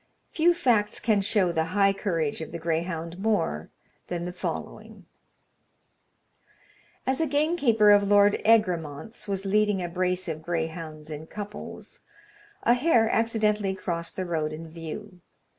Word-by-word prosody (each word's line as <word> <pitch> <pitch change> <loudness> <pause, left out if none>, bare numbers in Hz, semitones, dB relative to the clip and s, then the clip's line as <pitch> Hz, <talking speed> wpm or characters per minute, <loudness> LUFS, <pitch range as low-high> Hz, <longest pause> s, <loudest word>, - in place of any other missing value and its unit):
Few 345 +2 +3
facts 225 -9 +1
can 215 -3 +2
show 195 -2 +2
the 160 -1 0
high 195 -1 +5
courage 165 -7 -2
of 160 - -6
the 170 - -4
greyhound 165 +1 -3
more 195 - 0 0.4
than 175 -1 -3
the 180 - -5
following: 180 - -6 2.0
As 265 +3 0
a 320 - +2
gamekeeper 285 -8 +3
of 205 0 +7
Lord 205 0 +4
Egremont's 185 -2 +1
was 195 -1 -2
leading 210 0 +2
a 175 - -2
brace 180 +1 -1
of 160 -1 -4
greyhounds 160 -2 -4
in 155 +1 -7
couples, 205 +1 -8 0.6
a 240 - +5
hare 245 -4 +3
accidentally 215 -3 +1
crossed 170 -3 -4
the 185 - -3
road 160 -3 -1
in 160 +1 -7
view. 175 +4 -8
190 Hz, 140 wpm, -26 LUFS, 165-215 Hz, 2.0 s, of